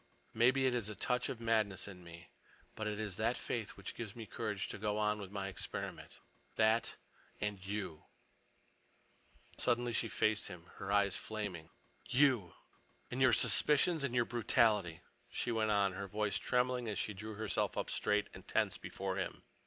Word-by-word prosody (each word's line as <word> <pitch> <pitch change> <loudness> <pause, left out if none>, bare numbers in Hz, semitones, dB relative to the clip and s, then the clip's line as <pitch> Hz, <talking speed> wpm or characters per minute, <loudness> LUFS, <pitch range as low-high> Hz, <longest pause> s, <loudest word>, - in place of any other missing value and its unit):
Maybe 130 +4 +4
it 130 - +3
is 115 -4 -1
a 105 - -5
touch 125 +4 0
of 120 - -4
madness 110 -5 +1
in 90 -3 -10
me. 85 0 -12 0.5
But 110 - -3
it 105 -1 -2
is 105 -4 -3
that 115 +3 +1
faith 115 -4 -3
which 100 - -6
gives 115 -1 -6
me 115 -2 -6
courage 105 -3 -3
to - - -6
go 105 0 0
on 105 0 +1
with 95 - -7
my 100 -1 -3
experiment. 95 - -6 0.4
That—and 110 -2 -1
you!" 95 -5 -4 1.5
Suddenly 120 -1 +1
she 115 - +1
faced 110 -1 +1
him, 90 -2 -10
her 95 - -4
eyes 100 -1 +3
flaming. 100 -7 -5 0.4
"You—and 125 - 0
your 130 -1 +7
suspicions 150 +6 +5
and 130 -3 -1
your 120 -1 +4
brutality," 105 -7 +2 0.3
she 120 - -1
went 110 -1 +1
on, 100 -2 +3
her 100 +1 -5
voice 105 0 0
trembling 125 0 +1
a - - -2
little - - -1
as - - -4
she 105 - -1
drew 105 +2 -7
herself 105 -3 -1
up - - -2
straight 105 0 +1
and - - -11
tense - - +1
before 95 0 -4
him. 95 - -3
105 Hz, 175 wpm, -35 LUFS, 100-120 Hz, 1.5 s, your